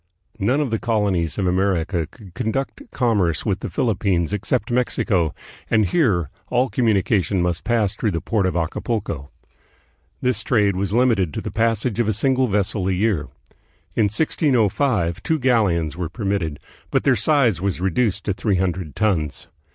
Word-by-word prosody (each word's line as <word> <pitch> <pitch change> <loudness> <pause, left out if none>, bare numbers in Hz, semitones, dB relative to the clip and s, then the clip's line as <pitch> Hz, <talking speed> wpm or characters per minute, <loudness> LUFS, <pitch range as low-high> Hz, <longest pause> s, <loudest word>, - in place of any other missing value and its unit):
None 125 +9 +2
of 140 -6 -2
the 115 - 0
colonies 100 -7 0
of 100 - 0
America 90 -2 0
could 100 -7 -15
conduct 130 - -3
commerce 100 - +1
with 100 -2 0
the - - -5
Philippines 100 -6 0
except 105 +2 -1
Mexico, 105 -8 +1 0.4
and 110 -2 +3
here 95 - +1 0.2
all 125 +1 +1
communica 105 -4 +2
tion 95 +1 -1
must 90 -1 -1
pass 115 -5 +1
through 110 - -1
the 85 -4 -1
port 100 -1 0
of 90 - -2
Acapulco. 85 - -2 0.9
This 125 -3 0
trade 105 -4 +2
was 95 0 -2
limited 110 - +2
to - - -2
the - - -5
passage 115 0 0
of 120 - +2
a 110 - +2
single 130 +4 +2
vessel 100 -2 0
a - - +1
year. 90 -6 0 0.7
In 110 - +2
1605 110 - +1
two 160 - 0
galleons 105 - +1
were 85 -2 -3
permitted, 95 -6 -2 0.3
but - - +1
their - - +4
size 125 - +3
was 100 -2 -1
reduced 95 +4 0
to 100 - -1
three 100 +1 0
hundred 90 -5 -2
tons. 85 -9 -1
100 Hz, 165 wpm, -21 LUFS, 90-115 Hz, 0.9 s, their